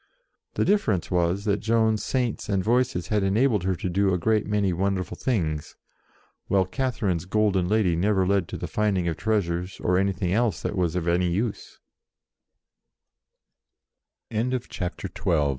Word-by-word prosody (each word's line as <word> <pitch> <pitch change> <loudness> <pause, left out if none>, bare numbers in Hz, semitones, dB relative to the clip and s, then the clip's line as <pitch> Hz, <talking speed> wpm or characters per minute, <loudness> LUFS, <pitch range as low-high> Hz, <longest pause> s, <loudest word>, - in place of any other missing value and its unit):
The - - +1
difference 110 - +1
was 90 +3 +1
that 105 -1 +1
Joan's 110 -2 +1
Saints 125 -4 -2
and 95 -2 +1
Voices 120 -5 +1
had 105 -1 +2
enabled 105 +3 +2
her 95 -1 +1
to 85 - -4
do 95 +2 +1
a 90 - +2
great 110 +4 +1
many 100 -3 +1
wonderful 95 +1 -1
things, 80 - -2 0.7
while 95 -1 +3
Catherine's 100 -6 -1
golden 100 -2 +1
lady 100 -4 +2
never 95 +2 +2
led 95 -2 +1
to - - -6
the - - -5
finding 100 -5 0
of 85 - -1
treasures 90 -4 -1
or 90 0 +2
anything 95 -2 0
else 110 -4 +1
tha 90 -3 -1
100 Hz, 125 wpm, -25 LUFS, 90-110 Hz, 0.7 s, while